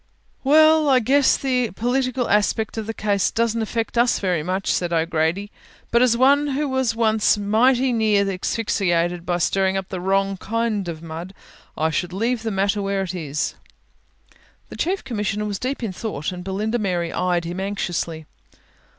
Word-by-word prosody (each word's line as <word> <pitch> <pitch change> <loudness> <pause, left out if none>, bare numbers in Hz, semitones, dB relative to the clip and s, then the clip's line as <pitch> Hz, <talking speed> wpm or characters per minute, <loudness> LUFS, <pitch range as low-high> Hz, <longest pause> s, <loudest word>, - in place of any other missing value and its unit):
"Well, 310 +2 +5
I 265 - +5
guess 270 +4 +3
the 250 -3 0
political 250 +2 0
aspect 210 +1 +1
of 220 -1 -4
the 225 - -3
case 200 -2 +1
doesn't 230 0 0
affect 230 +1 -2
us 240 0 +3
very 180 -5 0
much," 185 +4 -1
said 175 -1 -1
O'Grady, 165 +4 0 0.4
"but 235 - +4
as 240 -2 +4
one 280 +3 +4
who 285 +1 -1
was 260 -4 0
once 220 -2 +2
mighty 245 +5 +2
near 215 -3 +2
asphyxiated 180 -3 -1
by 175 -1 +1
stirring 190 +2 +1
up 190 -1 -5
the 185 -2 -5
wrong 195 +1 +1
kind 220 -2 -2
of 165 -1 -6
mud, 165 +4 -7 0.4
I 160 +1 +1
should 180 +2 -2
leave 230 +4 -1
the 225 - -2
matter 200 0 0
where 195 0 -1
it 185 -1 -5
is." 150 -4 -3 1.2
The - - -9
Chief 380 +3 -1
Commissioner 210 -2 -2
was 205 -2 -3
deep 255 0 -3
in 210 -5 -3
thought 185 -6 -4
and 180 -1 -7
Belinda 210 +5 -2
Mary 175 -5 -1
eyed 175 -2 0
him 175 +2 -5
anxiously. 175 -5 -3
205 Hz, 170 wpm, -22 LUFS, 180-235 Hz, 1.2 s, Well